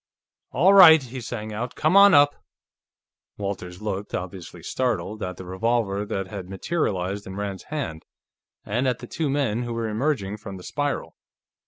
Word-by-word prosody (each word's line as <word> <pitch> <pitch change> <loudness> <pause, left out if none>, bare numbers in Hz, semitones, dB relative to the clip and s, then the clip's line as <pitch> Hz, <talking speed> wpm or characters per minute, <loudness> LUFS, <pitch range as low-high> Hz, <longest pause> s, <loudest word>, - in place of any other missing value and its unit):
"All 180 +9 +4
right!" 160 -6 +9
he 130 0 -7
sang 110 -2 -6
out. 120 +4 -4
"Come 155 +4 +1
on 200 -1 +8
up!" 145 0 +6 1.0
Walters 95 -2 -5
looked, 105 -1 -3
obviously 90 -2 -7
startled, 110 -2 -2
at 90 -1 -4
the 95 - -9
revolver 100 +1 -1
that 95 -1 -2
had 95 -1 -8
materialized 95 - -2
in 95 - -7
Rand's 100 -1 -5
hand, 130 - -5 0.6
and 120 +6 0
at 125 -2 +1
the - - -9
two 155 -3 -2
men 135 -5 0
who 120 -1 -4
were 115 -1 -2
emerging 110 -3 -1
from 100 -2 -8
the 90 - -11
spiral. 145 +5 -3
110 Hz, 165 wpm, -24 LUFS, 95-135 Hz, 1.0 s, right